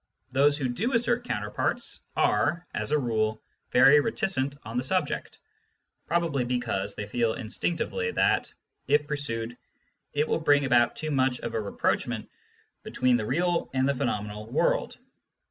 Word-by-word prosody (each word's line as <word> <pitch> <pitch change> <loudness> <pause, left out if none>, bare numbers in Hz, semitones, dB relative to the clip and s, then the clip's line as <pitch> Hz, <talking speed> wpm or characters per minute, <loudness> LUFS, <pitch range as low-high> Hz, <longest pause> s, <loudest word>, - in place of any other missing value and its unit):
Those 145 +2 +4
who 135 -3 -1
do 215 - -1
assert 240 +1 +2
counter 105 - -3
parts - - -1
are, 155 +11 +2
as - - -2
a 150 - +3
rule, 110 -4 0 0.3
very 135 +4 +7
reticent 165 - 0
on 115 +2 -5
the 125 - 0
subject, 130 - -2 0.7
probably 165 -6 +1
because 120 -5 -2
they 105 - -4
feel 115 +2 0
instinctively 170 - -2
that, - - +1 0.4
if 145 +1 +3
pursued, 120 -6 -3 0.6
it 150 +1 +1
will - - +1
bring 145 -3 +3
about 120 -2 +3
too 155 -1 -4
much 130 -2 +1
of 115 - -4
a 110 - 0
rapprochement 100 - -1 0.5
between 125 -1 +1
the 110 -3 -1
real 175 +6 0
and 130 0 +2
the 140 - +2
phenomenal 105 -5 -3
world. - - +1
130 Hz, 150 wpm, -27 LUFS, 115-150 Hz, 0.7 s, very